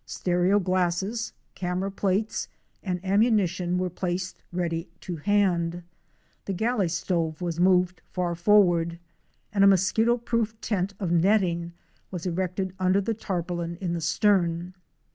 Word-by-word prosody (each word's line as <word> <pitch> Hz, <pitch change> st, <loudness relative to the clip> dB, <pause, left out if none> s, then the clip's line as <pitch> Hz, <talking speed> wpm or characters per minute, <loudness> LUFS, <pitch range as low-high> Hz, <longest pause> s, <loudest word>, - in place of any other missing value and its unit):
Stereo 180 Hz, +2 st, +1 dB
glasses, 185 Hz, +4 st, 0 dB, 0.2 s
camera 185 Hz, +2 st, -2 dB
plates, 200 Hz, +2 st, -1 dB, 0.3 s
and 180 Hz, -2 st, -2 dB
am 195 Hz, +2 st, +3 dB
munition 185 Hz, -6 st, +2 dB
were 180 Hz, 0 st, -1 dB
placed 180 Hz, +1 st, -3 dB
ready 170 Hz, -2 st, -2 dB
to 175 Hz, -2 st, -5 dB
hand; 175 Hz, -2 st, +1 dB, 0.6 s
the 195 Hz, -, -2 dB
galley 220 Hz, 0 st, +1 dB
stove 165 Hz, -1 st, -1 dB
was 170 Hz, -2 st, -3 dB
moved 180 Hz, 0 st, +3 dB
far 180 Hz, -2 st, -1 dB
forward, 175 Hz, -2 st, +3 dB, 0.6 s
and 200 Hz, -1 st, +4 dB
a -, -, +8 dB
mosquito 210 Hz, +5 st, +3 dB
proof 230 Hz, -2 st, -2 dB
tent 200 Hz, -3 st, -2 dB
of 185 Hz, -5 st, -2 dB
netting 175 Hz, -1 st, +2 dB, 0.4 s
was 180 Hz, -2 st, -6 dB
erected 185 Hz, +1 st, -2 dB
under 185 Hz, +1 st, +3 dB
the 215 Hz, +3 st, -1 dB
tarpaulin 175 Hz, -4 st, -3 dB
in 180 Hz, -3 st, -2 dB
the 170 Hz, -, -2 dB
stern. 175 Hz, 0 st, +1 dB
185 Hz, 135 wpm, -26 LUFS, 175-200 Hz, 0.6 s, a